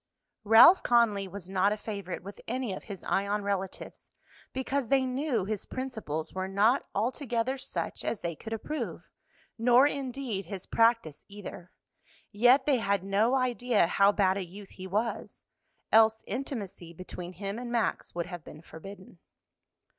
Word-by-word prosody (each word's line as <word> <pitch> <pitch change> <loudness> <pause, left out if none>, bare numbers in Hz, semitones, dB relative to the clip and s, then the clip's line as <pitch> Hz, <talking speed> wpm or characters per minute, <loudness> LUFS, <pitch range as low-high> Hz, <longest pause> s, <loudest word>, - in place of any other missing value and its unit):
Ralph 225 - +8
Conly 220 -5 +3
was 190 -1 -8
not 190 +1 +2
a 210 - -1
favorite 200 -5 -6
with 200 +2 -10
any 245 -3 -2
of - - -8
his 200 -3 -8
Ion 200 +1 0
relatives, 195 -2 -4 0.4
because 265 0 -2
they 265 -1 +3
knew 255 -5 -1
his 210 -1 -4
principles 220 - -4
were 185 0 -3
not 210 +7 +2
altogether 245 +3 -1
such 270 - -4
as 220 - -2
they 170 -1 -3
could 220 - -9
approve, 260 +8 -4 0.5
nor 245 +3 +6
indeed 265 -7 -2
his 190 +1 -7
practice 230 -10 +2
either; 200 -3 -9 0.6
yet 245 +5 +5
they 285 -3 +3
had 200 -4 0
no 205 +6 +2
idea 245 -5 +2
how 200 +4 +4
bad 195 -2 +2
a 195 - -2
youth 190 +3 -11
he 185 0 -9
was, 215 +5 -3 0.5
else 220 0 +5
intimacy 205 - -5
between 180 +1 -8
him 200 +4 -5
and 245 -1 -6
Max 235 -6 -1
would 170 -1 -1
have 175 -3 -8
been 150 +2 -12
forbidden. 185 +2 -12
210 Hz, 155 wpm, -29 LUFS, 190-245 Hz, 0.6 s, Ralph